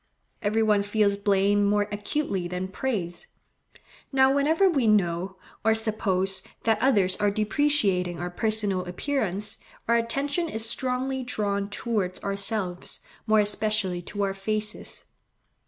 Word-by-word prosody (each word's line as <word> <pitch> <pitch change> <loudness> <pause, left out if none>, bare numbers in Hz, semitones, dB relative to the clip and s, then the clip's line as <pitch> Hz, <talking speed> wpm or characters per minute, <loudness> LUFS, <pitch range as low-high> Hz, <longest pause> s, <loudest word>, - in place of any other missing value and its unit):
Every 220 +1 +1
one 210 -2 +3
feels 205 0 +1
blame 200 0 +2
more 205 0 +2
acutely 205 -3 -2
than 180 +1 -4
praise. 190 -6 -3 0.8
Now, 265 -1 +4
whenever 315 +7 +3
we 275 -10 +2
know, 190 -2 +1 0.3
or 220 0 +4
suppose, 195 -4 +1 0.2
that 220 -1 +2
others 200 -8 +3
are 205 -1 +2
depreciating 205 - +1
our 175 0 -4
personal 210 -2 -1
appearance, 205 0 -1 0.3
our 235 0 +4
attention 280 +8 -1
is 220 -5 -2
strongly 260 +2 0
drawn 200 -5 -1
towards 205 -4 -1
ourselves, 200 -2 -1 0.3
more 215 0 +5
especially 205 -3 0
to 205 +3 -4
our 195 -1 0
faces. 210 +2 -2
210 Hz, 125 wpm, -26 LUFS, 195-230 Hz, 0.8 s, more